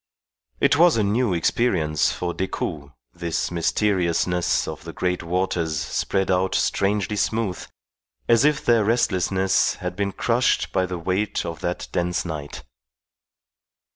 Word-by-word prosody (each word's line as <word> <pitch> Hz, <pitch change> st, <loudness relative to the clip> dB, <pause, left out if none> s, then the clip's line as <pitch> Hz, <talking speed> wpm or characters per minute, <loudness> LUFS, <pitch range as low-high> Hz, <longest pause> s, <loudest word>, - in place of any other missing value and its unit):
It -, -, +3 dB
was 170 Hz, -4 st, +5 dB
a 110 Hz, -, +2 dB
new 110 Hz, +2 st, +1 dB
experience 85 Hz, -, +1 dB
for 90 Hz, -1 st, -3 dB
Decoud, 80 Hz, -6 st, -4 dB, 0.2 s
this 85 Hz, -1 st, -2 dB
mysteriousness 90 Hz, -1 st, +1 dB
of -, -, -6 dB
the -, -, -8 dB
great 90 Hz, 0 st, -1 dB
waters 85 Hz, -2 st, -1 dB
spread 95 Hz, +5 st, -1 dB
out 95 Hz, +1 st, +1 dB
strangely 100 Hz, +1 st, 0 dB
smooth, 105 Hz, -2 st, -1 dB, 0.6 s
as 115 Hz, +2 st, +4 dB
if 150 Hz, 0 st, +2 dB
their 115 Hz, -2 st, +4 dB
restlessness 95 Hz, -4 st, +1 dB
had -, -, -5 dB
been 100 Hz, -1 st, -1 dB
crushed 120 Hz, +5 st, +1 dB
by 95 Hz, -1 st, +1 dB
the 90 Hz, -1 st, -4 dB
weight 95 Hz, +5 st, -1 dB
of 85 Hz, -2 st, -5 dB
that 90 Hz, +1 st, -3 dB
dense 90 Hz, +1 st, -1 dB
night. 75 Hz, -4 st, -6 dB
95 Hz, 135 wpm, -23 LUFS, 85-105 Hz, 0.6 s, was